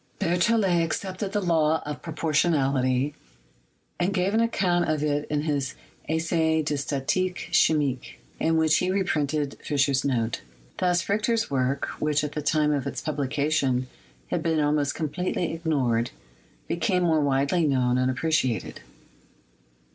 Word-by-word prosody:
Berthcllet 185 -1 +2
accepted 190 +4 -3
the 205 - 0
law 160 -3 +2
of 150 0 -5
proportionality 145 -4 +1 0.9
and 180 +2 +1
gave 190 +1 +1
an 220 - +3
account 185 -7 +1
of 155 -1 0
it 145 0 -1
in 150 -1 0
his 140 -4 -1 0.3
"Essai 160 0 +1
de 150 - -1
Statique 145 +6 -2
Chimique," 140 -5 +1 0.2
in 160 0 +2
which 160 -1 +4
he 180 - 0
reprinted 150 -7 -1
Fischer's 140 -2 +1
note. 120 -4 -1 0.4
Thus 175 -1 +1
Richter's 215 +1 0
work, 135 +1 0
which 150 0 +1
at 150 - -3
the 150 - -4
time 150 0 +2
of 140 -2 -1
its 130 -2 -4
publication 140 -2 0 0.5
had - - 0
been 160 -2 +1
almost 145 -1 +1
com 160 - -1
pletely 180 +1 -2
ignored, 130 -8 0 0.6
became 180 +2 0
more 160 -3 +3
widely 145 +4 +2
known 125 -2 +2
and 130 0 +2
appre 145 +6 -2
ciated. 125 - 0
155 Hz, 140 wpm, -26 LUFS, 140-175 Hz, 0.9 s, which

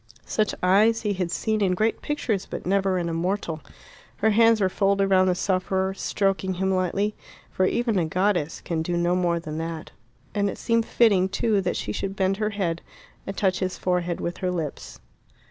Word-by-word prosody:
Such 215 -1 0
eyes 215 +5 +4
he 210 -2 0
had 180 -2 -2
seen 215 +4 -1
in 185 -2 +2
great 220 +4 0
pictures 240 -9 -2
but - - -6
never 195 0 +1
in 175 -1 -1
a 165 - -2
mortal. 170 -2 -2 0.5
Her 220 +1 +2
hands 225 +1 +5
were 195 - +3
folded 195 +1 +2
round 185 0 +5
the 180 - +2
sufferer, 190 0 0
stroking 195 -1 -1
him 190 +1 0
lightly, 190 +3 0 0.4
for 185 - +2
even 230 -3 +1
a 170 - +1
goddess 180 -2 0
can 165 -2 -2
do 175 +2 -1
no 175 +1 +2
more 175 -2 +1
than 155 -1 -6
that. 165 -1 -5 0.4
And 200 -1 +1
it - - -6
seemed 230 -1 +1
fitting, 200 -5 +3
too, 205 +1 +1
that 180 -1 -1
she 105 - -3
should 195 - -3
bend 190 0 +1
her 215 0 0
head 180 -5 -2 0.5
and 195 - -5
touch 190 -2 +1
his 185 -1 -2
forehead 180 -1 -1
with 175 - -3
her 185 - -1
lips. 165 -5 -5
190 Hz, 195 wpm, -25 LUFS, 180-205 Hz, 0.5 s, hands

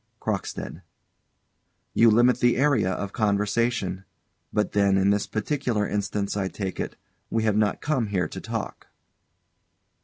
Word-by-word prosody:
CROCKSTEAD. 95 -4 -4 1.1
You 115 - +6
limit 120 +2 +4
the 120 -1 +3
area 130 -8 +3
of 100 +2 -4
conversation. 105 -2 0 0.5
But 105 0 0
then, 100 -1 +3
in 95 +1 +3
this 100 0 0
particular 110 -2 -1
instance, 100 0 -2
I 100 -2 0
take 95 -1 -5
it, - - -3 0.3
we 115 -1 0
have 110 -2 +2
not 105 -1 +1
come 135 -7 0
here 95 -5 0
to - - -8
talk? - - -5
105 Hz, 140 wpm, -25 LUFS, 100-115 Hz, 1.1 s, You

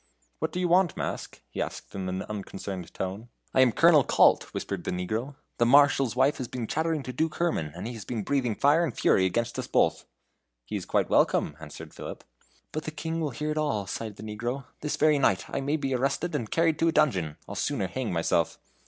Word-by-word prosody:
"What - - -1
do 180 - -3
you 180 - +1
want, 175 -1 +3
mask?" - - -5
he - - -3
asked, - - -6
in 95 -2 -3
an 95 +1 -3
unconcerned 95 -3 -6
tone. 100 +5 -5 0.2
"I 130 - +5
am 130 -2 +5
Colonel 160 +1 +6
Kalt," - - +4
whispered 95 -3 -4
the - - -3
negro. 110 +10 -3 0.2
"The 120 - +4
Marshal's 135 -2 +5
wife 135 +3 +3
has 130 - -3
been 125 -2 -4
chattering 160 +3 -1
to 130 - -6
Duke 160 +5 -1
Herman, 160 - 0
and - - -6
he 120 - -4
has 110 -3 -7
been 110 +1 -3
breathing 125 -3 0
fire 145 +8 +4
and 165 - -3
fury 95 - +4
against 115 +5 -1
us - - -4
both." - - +2 0.6
"He - - -5
is - - -4
quite - - +1
welcome," 75 - +3
answered 75 -2 -10
Philip. - - -8 0.5
"But 155 - -4
the - - -2
King 160 +2 -3
will 155 - 0
hear 150 +5 -3
it 155 - -1
all," 140 -10 0
sighed 105 +2 -5
the 105 - -10
negro. 120 +5 -4
"This 150 - -2
very 155 -2 +4
night 115 -8 +2
I 140 - -3
may 145 +3 0
be 135 -3 -2
arrested 135 +7 0
and 120 -7 -2
carried 165 -2 +2
to 165 - +3
a - - +4
dungeon; 90 - +1
I'll - - -6
sooner 95 - -1
hang 125 +1 -3
myself." 85 -1 +1
125 Hz, 225 wpm, -27 LUFS, 100-150 Hz, 0.6 s, Colonel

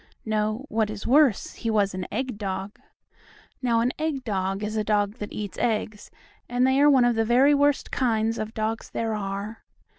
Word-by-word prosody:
No, 215 +3 -1
what 220 -3 0
is 215 -1 -6
worse, 270 -4 +3
he 230 - -4
was 205 -3 +2
an 185 -1 -4
egg 250 -1 -3
dog. 195 0 -4 0.8
Now 235 -3 +2
an 245 +2 +1
egg 305 -4 -2
dog 195 -2 -2
is 210 +1 -3
a 215 - 0
dog 210 +1 0
that 210 - -6
eats 205 -2 -6
eggs, 215 -2 -2 0.4
and 245 +1 +2
they 265 +1 +3
are 295 - +7
one 260 -4 +5
of 240 - +3
the 225 - +2
very 255 +6 +4
worst 285 0 +2
kinds 225 -3 0
of 215 +1 -5
dogs 220 +1 -2
there 225 -1 -2
are. 200 +1 -5
220 Hz, 190 wpm, -25 LUFS, 210-250 Hz, 0.8 s, are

